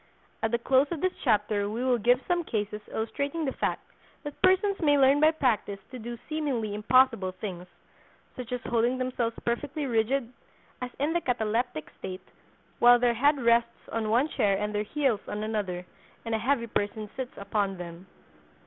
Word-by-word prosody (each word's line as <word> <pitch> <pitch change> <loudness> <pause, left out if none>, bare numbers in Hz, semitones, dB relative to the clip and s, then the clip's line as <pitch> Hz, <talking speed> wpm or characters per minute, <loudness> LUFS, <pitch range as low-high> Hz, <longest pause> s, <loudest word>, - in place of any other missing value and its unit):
At 225 - +1
the 235 - +1
close 265 +4 +3
of 340 - -3
this 370 +3 0
chapter 210 -3 +1
we 230 +4 -3
will 250 -2 +2
give 245 +4 +3
some 350 -1 +1
cases 210 -6 -3
illustrating 280 +8 -2
the 270 - 0
fact - - -2 0.4
that 290 -2 -8
persons 380 +2 +3
may 290 -3 +4
learn 275 +1 +5
by 310 +1 +6
practice 250 -10 0
to 255 - -7
do 235 +1 -6
seemingly 275 -9 -2
impossible 220 -3 +3
things, 180 -2 -6 0.7
such 250 -2 -7
as 250 -1 -2
holding 240 +1 +1
themselves 250 -3 -1
perfectly 285 +5 -2
rigid 240 +1 0 0.5
(as 250 - -3
in 295 +4 0
the 345 - +1
cataleptic 230 - -1
state) 185 0 -7 0.5
while 245 0 +8
their 240 0 +2
head 285 +5 +3
rests 235 0 +2
on 225 -1 -1
one 245 +7 +3
chair 205 -10 +1
and 210 +1 -2
their 205 - 0
heels 245 -1 0
on 210 +1 -4
another, 200 -5 -3 0.4
and 230 - -2
a 220 - +1
heavy 250 0 +1
person 210 -1 -2
sits 260 -2 -6
upon 200 -1 -1
them. 175 +1 -9
235 Hz, 175 wpm, -28 LUFS, 210-270 Hz, 0.7 s, while